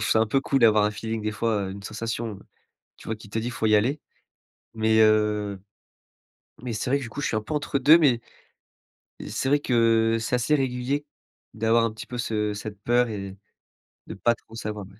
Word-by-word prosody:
trouve 110 - -1
ça 110 - +4
un 110 - +3
peu 135 +5 +1
cool 135 - +1
d'avoir 110 -4 +5
un 105 - +2
feeling 110 +1 -4
des 110 - -1
fois, 105 -2 -1
heu, 95 - -5
une 100 +1 -8
sensation, 115 -1 -4 0.6
tu - - -15
vois 110 - -2
qui 105 -1 -14
te 110 - -1
dit: 115 - -3
«il 125 - -3
faut 110 - -3
y 110 - +3
aller.» 125 +8 +1 0.7
Mais 110 0 +2
heu 105 -2 +2 1.0
mais 120 -3 -3
c'est 110 +4 -3
vrai 140 - +3
que 140 - -6
du 120 - -7
coup 145 - -5
je - - 0
suis - - -2
un - - -2
peu 155 - -5
entre 145 -1 -1
2. 150 +5 +7
Mais 130 -7 +3 1.1
c'est 110 +5 -2
vrai 145 +2 +3
que 115 -3 +2
c'est 115 +2 -1
assez 125 +5 +2
régulier 135 +1 -1 0.5
d'avoir 115 +1 +2
un 115 - -1
petit 110 - -9
peu 125 - -7
ce 105 -3 -1
cette 105 0 -7
peur 120 0 +3
et 100 -3 -6 0.7
de - - -7
pas 120 +5 +2
trop 115 - -19
savoir. 105 -3 -5
115 Hz, 220 wpm, -25 LUFS, 105-125 Hz, 1.1 s, 2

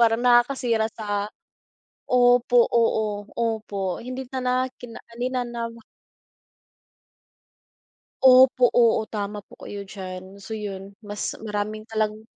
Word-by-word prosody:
parang, 230 0 +4
nakakasira 240 -2 +3
sa 205 -1 -2 0.8
opo 245 -1 +5
oo, 215 -3 +1
opo 215 -5 -2
hindi 255 +2 -6
na 260 - -2
na 250 0 0 0.3
kina 235 -2 -9 0.2
hindi 245 +2 -2
na 255 -1 -2
nam 235 -1 -5 2.5
Opo, 255 -1 +7
oo, 230 -2 +4
tama 205 -1 -4
po - - -18
kayo 200 -1 -6
diyan, 190 -1 -9
so 220 +3 -7
iyun 200 -2 -6
mas 205 -1 -4
maraming 215 0 -3
talang 215 -1 -1
220 Hz, 115 wpm, -24 LUFS, 205-245 Hz, 2.5 s, Opo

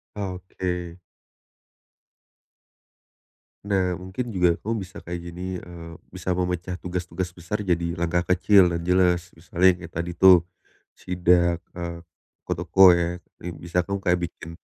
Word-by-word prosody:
Oke. 90 -3 -4 2.7
Nah, 95 -3 +1
mungkin 95 +7 -5
juga 90 -4 +3
kamu 115 +2 -2
bisa 95 - -12
kayak 85 +1 -5
gini, 90 +1 -5
eee, 85 -1 -10 0.2
bisa - - -4
memecah 90 0 -2
tugas-tugas 90 0 -4
besar 90 +4 -4
jadi 85 -2 +1
langkah 85 +1 +1
kecil 90 0 +5
dan 85 0 -3
jelas. 90 -1 +2
Misalnya 85 +2 0
yang - - -14
kayak 85 -1 -11
tadi 85 +1 -3
tuh, 90 -1 +6 0.5
sidak, 85 -1 +2 0.2
eee, 85 -1 -5 0.5
ke - - -2
toko 90 +2 +6
ya. 85 0 -1 0.4
Bisa 85 +1 -1
kamu 100 +2 -3
kayak 90 -2 +1
bikin 80 - -11
90 Hz, 130 wpm, -24 LUFS, 85-90 Hz, 2.7 s, tuh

